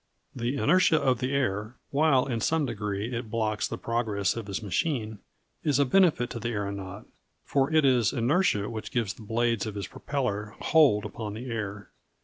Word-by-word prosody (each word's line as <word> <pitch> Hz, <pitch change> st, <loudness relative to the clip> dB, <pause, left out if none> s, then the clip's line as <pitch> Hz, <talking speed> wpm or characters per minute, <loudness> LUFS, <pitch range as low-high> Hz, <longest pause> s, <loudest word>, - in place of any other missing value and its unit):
The 120 Hz, +3 st, -2 dB
inertia 175 Hz, 0 st, +4 dB
of 130 Hz, -5 st, +1 dB
the 130 Hz, +1 st, -1 dB
air, 110 Hz, -4 st, -1 dB, 0.2 s
while 140 Hz, -3 st, +3 dB
in 120 Hz, -4 st, -2 dB
some 160 Hz, +4 st, +1 dB
degree 105 Hz, 0 st, -3 dB
it 115 Hz, -1 st, -4 dB
blocks 110 Hz, -2 st, -1 dB
the -, -, -5 dB
progress 110 Hz, -5 st, -1 dB
of 115 Hz, -3 st, -5 dB
his 100 Hz, +2 st, -4 dB
machine, 110 Hz, -, -1 dB, 0.4 s
is 145 Hz, -3 st, +2 dB
a 140 Hz, -, +4 dB
benefit 150 Hz, -5 st, +3 dB
to 115 Hz, -, -5 dB
the 115 Hz, -, -3 dB
aeronaut, 100 Hz, -2 st, -4 dB, 0.4 s
for 140 Hz, +1 st, +1 dB
it 155 Hz, -2 st, +4 dB
is 125 Hz, -5 st, +4 dB
inertia 120 Hz, -, +1 dB
which 110 Hz, -2 st, -5 dB
gives 115 Hz, -5 st, -1 dB
the -, -, -15 dB
blades 115 Hz, 0 st, 0 dB
of 105 Hz, -, -5 dB
his 100 Hz, -2 st, -3 dB
propeller 105 Hz, -5 st, -3 dB
"hold" 140 Hz, -11 st, +4 dB
upon 105 Hz, -2 st, -5 dB
the 120 Hz, +3 st, -6 dB
air. 105 Hz, -2 st, -5 dB
115 Hz, 180 wpm, -27 LUFS, 105-135 Hz, 0.4 s, inertia